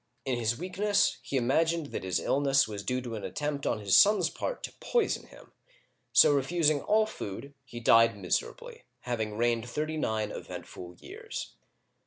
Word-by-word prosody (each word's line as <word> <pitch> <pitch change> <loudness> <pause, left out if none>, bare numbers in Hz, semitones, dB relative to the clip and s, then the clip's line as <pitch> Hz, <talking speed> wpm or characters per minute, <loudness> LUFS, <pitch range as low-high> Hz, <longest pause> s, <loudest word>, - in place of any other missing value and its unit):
In 130 -3 -1
his 115 0 0
weakness, 185 -1 +1
he 140 0 -3
imagined 160 +5 +1
that - - -4
bis 95 -1 -1
illness 135 -2 +2
was 105 -2 -6
due 125 +6 -2
to 120 -2 -6
an 110 - -5
attempt 145 -1 -3
on - - 0
his 100 -3 +2
son's 210 +1 +5
part - - -4
to - - -6
poison 470 -4 0
him, - - -16 0.6
so - - +6
refusing 150 +1 +2
all 215 +1 +3
food, 140 - -7
he 120 -2 -9
died 115 -1 +5
miserably, 95 -3 -3 0.2
having 110 -4 -3
reigned 120 0 0
thirty 155 +4 -3
nine 110 -7 -1
eventful 90 0 -9
years. - - -8
130 Hz, 165 wpm, -29 LUFS, 110-155 Hz, 0.6 s, so